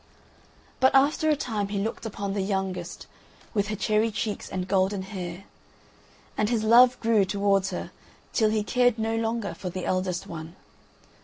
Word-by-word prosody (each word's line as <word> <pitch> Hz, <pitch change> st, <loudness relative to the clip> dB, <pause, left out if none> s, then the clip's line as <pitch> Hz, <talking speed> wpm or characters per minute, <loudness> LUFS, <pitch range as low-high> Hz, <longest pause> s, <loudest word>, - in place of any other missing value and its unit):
But 260 Hz, +1 st, +4 dB
after 295 Hz, +3 st, +4 dB
a 305 Hz, -, +4 dB
time 220 Hz, -8 st, -2 dB
he 200 Hz, 0 st, -3 dB
looked 220 Hz, +3 st, -3 dB
upon 200 Hz, -2 st, -4 dB
the 200 Hz, -, -1 dB
youngest, 190 Hz, -3 st, -3 dB, 0.5 s
with 205 Hz, -1 st, +1 dB
her 215 Hz, -, -2 dB
cherry 215 Hz, +2 st, +1 dB
cheeks 210 Hz, 0 st, -4 dB
and 185 Hz, -1 st, -3 dB
golden 190 Hz, 0 st, +1 dB
hair, 185 Hz, -2 st, -6 dB, 0.9 s
and 210 Hz, -, +1 dB
his 230 Hz, -3 st, 0 dB
love 245 Hz, +3 st, +6 dB
grew 225 Hz, -3 st, +3 dB
towards 195 Hz, 0 st, +1 dB
her -, -, -5 dB, 0.4 s
till 220 Hz, -3 st, +3 dB
he 215 Hz, -1 st, 0 dB
cared 245 Hz, +1 st, +2 dB
no 225 Hz, 0 st, -1 dB
longer 225 Hz, -2 st, -2 dB
for 185 Hz, -, -6 dB
the 185 Hz, +1 st, -5 dB
eldest 185 Hz, -1 st, -1 dB
one. 160 Hz, +1 st, -8 dB
205 Hz, 165 wpm, -26 LUFS, 190-225 Hz, 0.9 s, love